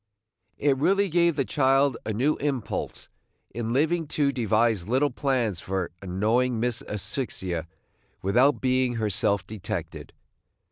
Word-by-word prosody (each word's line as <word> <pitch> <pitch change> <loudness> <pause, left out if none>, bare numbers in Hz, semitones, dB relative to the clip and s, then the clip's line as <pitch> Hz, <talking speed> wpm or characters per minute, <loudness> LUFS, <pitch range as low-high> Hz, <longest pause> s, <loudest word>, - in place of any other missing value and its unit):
It 140 -2 +2
really 195 +7 +2
gave 170 -1 +3
the 135 -2 0
child 135 -1 +3
a - - 0
new 130 +8 +1
impulse 135 -6 -3 0.4
in 115 +1 -3
living 160 +5 +1
to 145 -2 +3
devise 110 -5 +1
little 130 +5 +2
plans 125 - 0
for 95 0 -3
annoying 110 +6 +1
Miss 120 0 0
Asphyxia 95 - -3 0.6
without 125 +9 +3
being 130 -1 +1
herself 100 -2 0
detected. 110 -3 -6
125 Hz, 125 wpm, -26 LUFS, 105-140 Hz, 0.6 s, gave